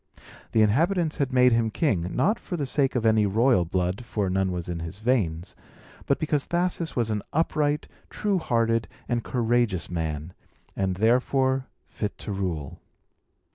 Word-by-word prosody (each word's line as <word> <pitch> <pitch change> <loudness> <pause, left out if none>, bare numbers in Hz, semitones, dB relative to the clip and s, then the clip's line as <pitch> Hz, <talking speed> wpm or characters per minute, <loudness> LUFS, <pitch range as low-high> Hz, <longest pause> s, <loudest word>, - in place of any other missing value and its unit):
The 110 - +4
inhabitants 160 - +2
had 140 -3 0
made 125 -1 +5
him 115 -1 +2
king, 105 - 0
not 215 +4 +2
for 175 - -5
the 145 - -1
sake 135 0 0
of 120 -2 0
any 110 -2 +4
royal 110 -2 +3
blood 90 +5 -1
(for 105 -5 -2
none 95 0 +1
was 90 -1 -4
in 85 -1 -3
his 85 +3 -6
veins), 100 -7 -1 0.5
but 140 - +3
because 150 -2 0
Thasus 175 -1 -1
was 115 -3 0
an 105 -1 -1
upright, 150 -1 +1 0.2
true 200 -3 0
hearted, 115 -5 +1 0.2
and 120 -2 -1
courageous 120 -7 0
man, 80 0 -3 0.4
and 95 -1 0
therefore 130 +5 +2 0.2
fit 105 -1 -4
to - - -6
rule. 90 -8 -3
115 Hz, 160 wpm, -26 LUFS, 95-135 Hz, 0.5 s, made